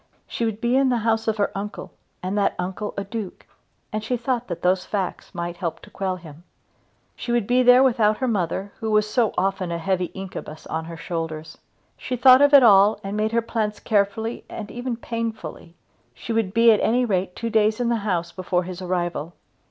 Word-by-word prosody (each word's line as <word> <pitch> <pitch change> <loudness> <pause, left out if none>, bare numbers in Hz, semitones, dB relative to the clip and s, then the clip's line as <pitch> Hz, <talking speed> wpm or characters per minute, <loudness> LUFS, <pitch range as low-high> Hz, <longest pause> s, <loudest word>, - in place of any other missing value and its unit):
She 235 - -2
would 220 -2 -2
be 235 +2 +1
in 270 0 +4
the 245 - +2
house 225 0 +1
of 220 0 +1
her 205 - 0
uncle 205 +1 -6 0.3
and 185 +2 -2
that 205 -1 +1
uncle 190 +4 -4
a 200 - -1
duke, 205 -1 -6 0.5
and 215 0 -2
she 245 +3 -1
thought 245 0 -2
that 175 - -6
those 180 +1 +2
facts 195 -3 -4
might 170 0 -4
help 170 -3 -3
to - - -15
quell 190 -1 -2
him. 165 -4 -11
And 170 - -20 0.7
she 240 - -5
would 240 -3 +1
be 245 +3 +3
there 250 +1 +7
without 220 -5 +3
her 260 - -1
mother, 195 -2 -1
who 225 - -3
was 215 0 +3
so 225 0 +1
often 190 -1 0
a 170 - -1
heavy 180 +2 0
incubus 185 -5 -8
on 160 0 -4
her 165 0 -8
shoulders. 160 -2 -5 0.4
She 255 - -4
thought 255 +2 +7
of 285 0 +6
it 280 -3 +8
all, 205 -1 +6
and 195 +1 -4
made 215 +1 0
her 235 0 +1
plans 220 -2 -2
carefully 220 +2 0
and 210 -2 -7
even 245 -1 -4
painfully. 225 -8 -5 0.4
She 120 - -5
would 225 -4 0
be 230 +2 +6
at 215 - +4
any 245 +2 +2
rate 185 -4 -1
two 230 -1 -4
days 215 0 +2
in 240 -1 +1
the 235 - +2
house 180 -5 -2
before 180 -1 -1
his 180 +1 -7
arrival. 175 -2 -2
210 Hz, 215 wpm, -23 LUFS, 180-230 Hz, 0.7 s, it